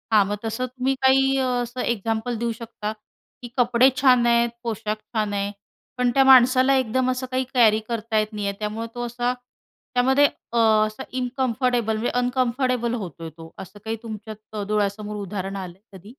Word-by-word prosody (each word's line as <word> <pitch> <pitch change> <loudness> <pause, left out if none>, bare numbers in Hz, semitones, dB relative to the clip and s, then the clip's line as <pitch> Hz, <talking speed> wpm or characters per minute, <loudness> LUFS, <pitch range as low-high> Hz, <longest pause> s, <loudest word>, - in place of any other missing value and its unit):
हां, 205 -2 +6
मग 205 - -1
तसं 225 +3 -2
तुम्ही 255 +2 -2
काही 270 +1 +4
अ, 260 - +1 0.2
असं 245 +1 -5
एक्झाम्पल 225 +1 -1
देऊ 235 0 -1
शकता, 220 -2 -5 0.5
की 240 - -7
कपडे 245 +1 +5
छान 250 -3 +5
आहेत, 235 0 +3
पोशाख 215 -2 -2 0.2
छान 210 -1 0
आहे, 200 0 -1 0.5
पण 250 -1 +2
त्या 270 - +6
माणसाला 260 +1 +6
एकदम 255 +1 +1
असं 255 +1 -3
काही 260 0 0
कॅरी 220 -3 +5
करता 225 -1 -2
येत 215 +1 -2
नाही 205 -1 -3
आहे, 200 - -2
त्यामुळे 215 +2 -3
तो 240 0 -3
असा 245 +1 -1 0.6
त्यामध्ये, 265 +3 +4 0.3
अ, - - 0 0.3
असा 215 +5 -8 0.2
इनकंफर्टेबल 245 -3 0
म्हणजे 230 - -1
अनकंफर्टेबल 250 -1 0
होतोय 165 - -6
तो 165 0 -11
असं 190 +2 -10
काही 225 +1 -2
तुमच्या 215 -1 -7
डोळ्यासमोर 210 0 -1
उदाहरण 195 -1 -5
आलंय 185 0 -8 0.2
कधी? 185 - -19
235 Hz, 170 wpm, -23 LUFS, 210-255 Hz, 0.6 s, हां